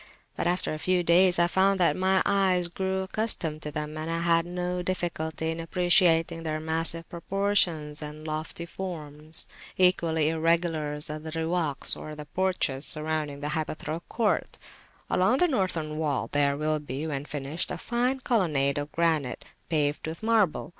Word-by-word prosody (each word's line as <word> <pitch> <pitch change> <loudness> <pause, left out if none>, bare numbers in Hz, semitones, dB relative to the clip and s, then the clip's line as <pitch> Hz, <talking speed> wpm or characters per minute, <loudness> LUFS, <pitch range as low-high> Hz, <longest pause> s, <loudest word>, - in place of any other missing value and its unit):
But - - -1
after 175 -2 0
a 155 - -5
few 180 +1 +1
days 175 +2 +5
I 170 - +5
found 190 +2 +2
that 170 -4 +3
my 190 0 +3
eye 190 -3 +3
grew 190 0 -1
accustomed 190 -6 0
to 150 - -4
them, 150 0 -4
and 155 +1 -4
I 165 0 -1
had 170 0 +2
no 180 0 -2
difficulty 160 -3 -2
in 165 - -5
appreciating 165 -1 +3
their 155 -1 -2
massive 165 +1 -2
proportions 170 -5 0
and 150 +1 -7
lofty 155 +2 -4
forms. 155 -4 -2 0.3
Equally 165 -4 +3
irregular 165 -2 +1
are 150 +1 -5
the 160 +1 -8
Riwaks, 160 -2 +2
or 155 0 -8 0.2
porches, 180 -8 0
surrounding 155 -2 -2
the 145 - -2
hypaethral 155 +1 -3
court. 225 -3 0 0.5
Along 205 +8 +2
the 355 - +4
Northern 170 - -1
wall 150 -4 -1
there 140 -1 +2
will 155 +1 0
be, 145 +1 -5
when 140 -3 -3
finished, 150 +3 -2
a - - -3
fine 250 +2 -1
colonnade 150 - +1
of 145 +1 -5
granite, 160 -7 0 0.2
paved 150 -1 0
with 160 +5 -6
marble. 220 -7 +2
165 Hz, 160 wpm, -27 LUFS, 155-180 Hz, 0.5 s, days